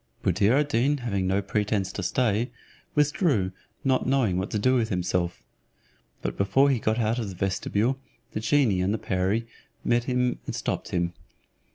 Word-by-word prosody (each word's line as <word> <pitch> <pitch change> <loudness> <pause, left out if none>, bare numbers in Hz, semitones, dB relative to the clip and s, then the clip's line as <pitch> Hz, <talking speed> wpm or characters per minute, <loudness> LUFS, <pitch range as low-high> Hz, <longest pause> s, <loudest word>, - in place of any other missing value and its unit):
Buddir 105 +4 +3
ad 145 +1 +2
Deen 140 +4 +2
having 100 -7 -1
no 95 +2 +1
pretence 100 -1 0
to 100 - -4
stay, 115 +4 +1 0.5
withdrew, 145 - +2 0.3
not 130 -2 +2
knowing 125 -9 +2
what 95 - -3
to - - -1
do 130 +5 +3
with 115 -3 +2
himself. 90 -2 -1 0.8
But - - -3
before 135 +9 +4
he 130 - +1
got 110 +1 0
out 115 +1 +1
of 110 -4 -3
the 95 - -8
vestibule, 100 +7 0 0.3
the - - -3
genie 115 -5 +2
and 95 +4 +1
the - - -1
perie 95 +4 0 0.4
met 120 +1 +2
and 125 -1 +1
stopped - - -3
him. 85 -1 -1
110 Hz, 170 wpm, -26 LUFS, 95-130 Hz, 0.8 s, before